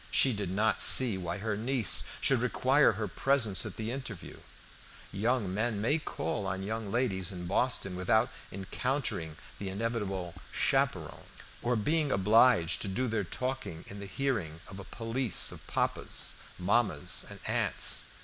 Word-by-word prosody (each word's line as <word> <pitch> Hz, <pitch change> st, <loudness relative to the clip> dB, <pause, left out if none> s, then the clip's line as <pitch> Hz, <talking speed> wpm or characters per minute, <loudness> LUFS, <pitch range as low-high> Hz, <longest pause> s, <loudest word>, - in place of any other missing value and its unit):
She 130 Hz, -, +5 dB
did 100 Hz, -3 st, -3 dB
not 105 Hz, +3 st, +1 dB
see 125 Hz, -6 st, +6 dB
why 90 Hz, 0 st, -4 dB
her 110 Hz, +1 st, -2 dB
niece 120 Hz, +1 st, +4 dB, 0.2 s
should 135 Hz, -3 st, +3 dB
require 130 Hz, +1 st, +3 dB
her 105 Hz, +1 st, -3 dB
presence 110 Hz, -3 st, +1 dB
at 105 Hz, -, -7 dB
the 110 Hz, +1 st, -4 dB
interview; 125 Hz, -8 st, -7 dB, 0.7 s
young 105 Hz, -1 st, -1 dB
men 110 Hz, +1 st, -1 dB
may 145 Hz, +10 st, +1 dB
call 140 Hz, -9 st, -4 dB
on 95 Hz, 0 st, -3 dB
young 110 Hz, 0 st, -4 dB
ladies 100 Hz, -6 st, -1 dB
in 90 Hz, -2 st, -7 dB
Boston 100 Hz, 0 st, +1 dB
without 110 Hz, +7 st, +1 dB, 0.2 s
encountering 95 Hz, -, -3 dB, 0.2 s
the 100 Hz, -, -4 dB
inevitable 95 Hz, -4 st, -3 dB, 0.2 s
chaperon, -, -, 0 dB, 0.4 s
or 120 Hz, +1 st, 0 dB
being 150 Hz, +7 st, +1 dB
obliged 105 Hz, -3 st, +4 dB
to -, -, -3 dB
do 125 Hz, +7 st, -1 dB
their 110 Hz, -3 st, -1 dB
talking 125 Hz, -4 st, -5 dB
in 100 Hz, -, -8 dB
the 100 Hz, -, -7 dB
hearing 105 Hz, -, -2 dB
of 95 Hz, -, -10 dB
a -, -, -7 dB
police 115 Hz, +5 st, +1 dB
of -, -, -10 dB
papas, -, -, -2 dB, 0.2 s
mammas, 100 Hz, -4 st, +1 dB
and -, -, -10 dB
aunts. -, -, 0 dB
110 Hz, 150 wpm, -30 LUFS, 95-125 Hz, 0.7 s, see